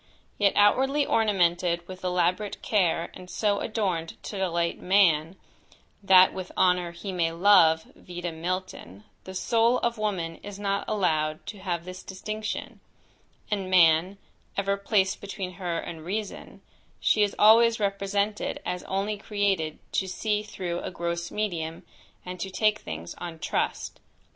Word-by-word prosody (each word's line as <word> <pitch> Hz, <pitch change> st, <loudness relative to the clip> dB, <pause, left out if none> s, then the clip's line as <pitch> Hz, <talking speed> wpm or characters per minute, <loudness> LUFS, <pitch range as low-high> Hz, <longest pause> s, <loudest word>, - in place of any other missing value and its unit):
Yet 200 Hz, -2 st, +4 dB
outwardly 270 Hz, +8 st, +4 dB
ornamented 175 Hz, -6 st, +1 dB
with 185 Hz, 0 st, -10 dB
elaborate 180 Hz, +3 st, 0 dB
care, 175 Hz, -5 st, +1 dB
and 180 Hz, -1 st, -11 dB
so 205 Hz, 0 st, 0 dB
adorned 185 Hz, -7 st, -2 dB
to 205 Hz, -, -6 dB
delight 170 Hz, -2 st, -1 dB
man, 180 Hz, -3 st, +3 dB, 0.7 s
"that 185 Hz, -2 st, +6 dB
with 185 Hz, -1 st, -6 dB
honour 180 Hz, -1 st, +3 dB
he 180 Hz, +3 st, -6 dB
may 170 Hz, -3 st, 0 dB
love," 165 Hz, -3 st, +5 dB
(Vide 175 Hz, -1 st, -6 dB
Milton) 170 Hz, -, -5 dB, 0.2 s
the 190 Hz, -, -8 dB
soul 230 Hz, +5 st, +2 dB
of 235 Hz, -1 st, -1 dB
woman 175 Hz, -6 st, -2 dB
is 205 Hz, -1 st, -9 dB
not 200 Hz, -1 st, -1 dB
allowed 155 Hz, -6 st, 0 dB
to 205 Hz, -, -8 dB
have 175 Hz, -3 st, -3 dB
this 185 Hz, 0 st, -8 dB
distinction, 215 Hz, +3 st, -5 dB, 0.7 s
and 195 Hz, -3 st, -1 dB
man, 175 Hz, +1 st, +4 dB, 0.4 s
ever 200 Hz, 0 st, +1 dB
placed 200 Hz, -1 st, +1 dB
between 195 Hz, -2 st, -5 dB
her 175 Hz, -2 st, -1 dB
and 165 Hz, -1 st, -6 dB
reason, 205 Hz, +4 st, -5 dB, 0.4 s
she 215 Hz, -, +2 dB
is 205 Hz, -1 st, +2 dB
always 230 Hz, +2 st, +6 dB
represented 200 Hz, +1 st, -1 dB
as 180 Hz, 0 st, -3 dB
only 200 Hz, +2 st, -2 dB
created 200 Hz, -7 st, -1 dB
to 190 Hz, -, 0 dB
see 210 Hz, +2 st, -1 dB
through 180 Hz, -4 st, -4 dB
a -, -, -5 dB
gross 170 Hz, -1 st, -3 dB
medium, 170 Hz, -6 st, -3 dB, 0.4 s
and 180 Hz, 0 st, -7 dB
to 190 Hz, -, -3 dB
take 215 Hz, +2 st, +1 dB
things 80 Hz, +2 st, -7 dB
on 170 Hz, -2 st, -6 dB
trust. -, -, -2 dB
185 Hz, 145 wpm, -26 LUFS, 170-205 Hz, 0.7 s, that